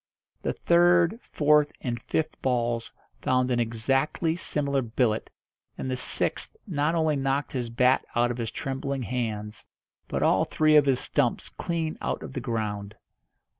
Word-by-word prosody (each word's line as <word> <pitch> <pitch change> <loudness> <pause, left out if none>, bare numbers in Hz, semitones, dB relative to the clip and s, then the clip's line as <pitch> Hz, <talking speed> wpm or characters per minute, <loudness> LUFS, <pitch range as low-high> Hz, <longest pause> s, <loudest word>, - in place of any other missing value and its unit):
The - - -1
third, 175 +4 +4
fourth, 150 0 +3
and 120 -3 -3
fifth 155 +4 -2
balls 120 -2 0 0.3
found 130 0 +1
an 120 - +2
exactly 135 +8 0
similar 140 -5 -1
billet, 115 -2 0 0.5
and 130 - -3
the - - 0
sixth 130 - -1
not 160 -4 0
only 160 -2 +2
knocked 135 +1 -1
his 125 -3 -2
bat 125 +3 +3
out 120 +1 +3
of 120 - -5
his 115 -1 -2
trembling 135 +1 -3
hands, 105 -2 -4 0.4
but - - -1
all - - +4
three 155 0 +3
of 145 -2 +6
his 130 -2 +3
stumps - - 0
clean 165 -2 -3
out - - -2
of - - -8
the 130 - -3
ground. 105 -4 -3
130 Hz, 155 wpm, -27 LUFS, 120-150 Hz, 0.5 s, of